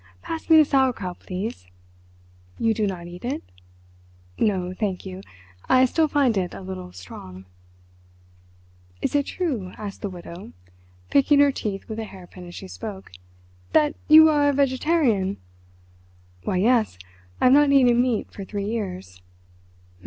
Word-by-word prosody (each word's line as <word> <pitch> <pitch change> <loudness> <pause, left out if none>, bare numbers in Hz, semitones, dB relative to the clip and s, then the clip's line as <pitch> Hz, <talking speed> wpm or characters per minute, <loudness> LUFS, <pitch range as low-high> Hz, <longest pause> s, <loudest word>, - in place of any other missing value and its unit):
Pass 325 0 -6
me 320 - +8
the 310 - +7
sauerkraut, 255 -11 0
please. 185 - -6 0.9
You 225 -1 +2
do 215 -1 0
not 180 -3 -5
eat 175 +1 -10
it?" 250 +3 -3 1.0
"No, 185 -4 0
thank 190 -2 -3
you. 190 0 -7 0.5
I 260 0 +6
still 315 +5 +2
find 280 -6 +2
it 180 -2 -4
a 100 - -8
little 90 -1 -7
strong." 90 +1 -11 1.6
"Is - - 0
it 285 -1 +1
true," 250 - -3
asked 205 -2 -7
the 200 - -3
Widow, 175 +1 -10 0.6
picking 280 +1 +4
her 285 -1 +6
teeth 205 -6 -5
with 220 0 -5
a 220 - -3
hairpin 180 -2 -12
as 175 - -10
she 190 - -8
spoke, 195 - -8 0.6
"that 300 0 +4
you 315 +1 +9
are 295 -2 +3
a - - +1
vegetarian?" 260 - +1 1.1
"Why, 185 - 0
yes; 220 - +2 0.4
I - - -2
have 255 - +7
not 290 0 +5
eaten 245 -3 +5
meat 245 -3 -1
for 200 - -8
three 200 +1 -4
years." 185 - -5
215 Hz, 150 wpm, -24 LUFS, 185-275 Hz, 1.6 s, you